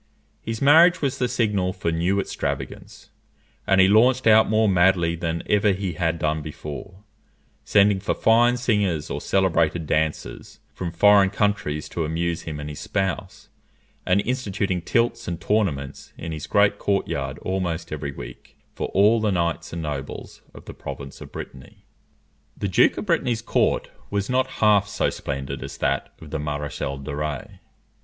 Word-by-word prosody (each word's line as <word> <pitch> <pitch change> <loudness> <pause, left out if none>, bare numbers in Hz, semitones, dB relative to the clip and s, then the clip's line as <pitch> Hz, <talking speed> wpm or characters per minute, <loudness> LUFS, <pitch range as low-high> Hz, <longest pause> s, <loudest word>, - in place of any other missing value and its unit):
His 115 +3 -4
marriage 165 +4 +6
was 140 -1 -1
the 125 - +1
signal 105 -6 0
for 90 -3 -2
new 85 +5 +1
extravagance, - - -5 0.6
and 95 -1 +4
he 95 - +7
launched 120 +5 +4
out 110 0 +6
more 110 0 +3
madly 90 -3 +3
than 85 0 -3
ever 105 -1 +3
he 95 -2 -3
had 85 0 -1
done 80 -1 -1
before; 80 +6 -8 0.6
sending 100 -1 +4
for 100 - -1
fine 120 +2 +4
singers 105 -10 0
or - - -3
celebrated 85 -4 +1
dancers 80 0 -2
from 85 -2 -4
foreign 100 +3 +5
countries 100 -8 -1
to 85 - -3
amuse 85 +2 -2
him 75 -2 -6
and 75 - -6
his 75 -1 -7
spouse; 95 -2 -3 0.5
and 95 +2 +2
instituting 100 -7 -2
tilts 115 +7 0
and 85 -2 -3
tournaments 80 -11 -2
in 80 - -6
his 75 -1 -6
great 100 0 +3
court 100 -1 0
yard 70 0 -3
almost 90 -3 -2
every 75 -2 -4
week - - -11 0.2
for - - -3
all 105 +4 +5
the 110 - +1
knights 85 -2 -1
and 85 -1 -5
nobles 70 -2 -6
of - - -12
the - - -8
province 70 0 -8
of - - -10
Brittany. 65 -1 -10 0.7
The 100 - -2
Duke 95 - +3
of - - -4
Brittany's 125 - 0
court - - 0 0.2
was 100 +2 -2
not 130 +1 +2 0.2
half 105 -2 +5
so 105 0 -1
splendid 70 -1 -5
as - - -7
that 70 - -1
of 80 -2 -12
the - - -2
Maréchal 75 -2 -4
de 70 0 -5
Rays. 75 -1 -4
95 Hz, 165 wpm, -23 LUFS, 80-105 Hz, 0.7 s, he